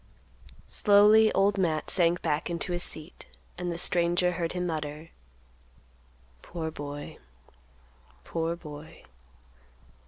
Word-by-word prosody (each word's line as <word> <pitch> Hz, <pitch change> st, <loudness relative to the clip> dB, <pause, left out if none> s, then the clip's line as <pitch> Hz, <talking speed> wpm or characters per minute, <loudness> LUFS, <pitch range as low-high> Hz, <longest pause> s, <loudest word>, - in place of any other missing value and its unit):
Slowly 210 Hz, +1 st, +5 dB
Old 200 Hz, +1 st, +2 dB
Matt 160 Hz, -4 st, 0 dB
sank 175 Hz, -1 st, +3 dB
back 155 Hz, +2 st, -1 dB
into 170 Hz, +1 st, -3 dB
his 175 Hz, -, -2 dB
seat 155 Hz, -1 st, -3 dB, 0.3 s
and 175 Hz, 0 st, -4 dB
the 170 Hz, -, -4 dB
stranger 175 Hz, +1 st, +1 dB
heard 170 Hz, -1 st, -3 dB
him 180 Hz, 0 st, -2 dB
mutter, 155 Hz, -1 st, -5 dB, 1.3 s
"Poor 160 Hz, -2 st, -5 dB
boy, 145 Hz, -1 st, -8 dB, 1.0 s
poor 165 Hz, 0 st, -2 dB
boy." 150 Hz, -2 st, -11 dB
170 Hz, 105 wpm, -28 LUFS, 160-180 Hz, 1.3 s, Slowly